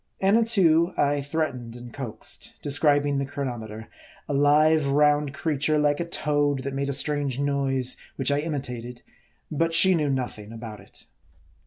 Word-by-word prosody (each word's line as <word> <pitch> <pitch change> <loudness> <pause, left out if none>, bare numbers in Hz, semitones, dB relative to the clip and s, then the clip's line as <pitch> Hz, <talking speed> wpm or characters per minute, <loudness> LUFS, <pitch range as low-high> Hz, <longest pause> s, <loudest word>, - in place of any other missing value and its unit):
Annatoo, 190 -5 +3
I 145 0 +2
threatened 140 -6 -3
and 120 -1 -10
coaxed; 130 -6 -5
describing 145 0 +2
the 140 - -1
chro 140 0 -4
nometer 110 -3 -6 0.4
a - - -3
live, 150 +2 +4
round 145 0 +3
creature 155 0 0
like 145 -1 +2
a 170 - -1
toad, 145 -4 0
that 140 +1 -4
made 140 +1 -2
a - - 0
strange 140 -1 0
noise, 135 -2 0 0.2
which 135 0 0
I 145 - +2
imitated; 125 -6 -5 0.5
but 165 +2 +1
she 190 +3 +6
knew 150 -4 +1
nothing 120 -5 -4
about 115 -2 -8
it. - - -14
145 Hz, 155 wpm, -25 LUFS, 130-150 Hz, 0.5 s, she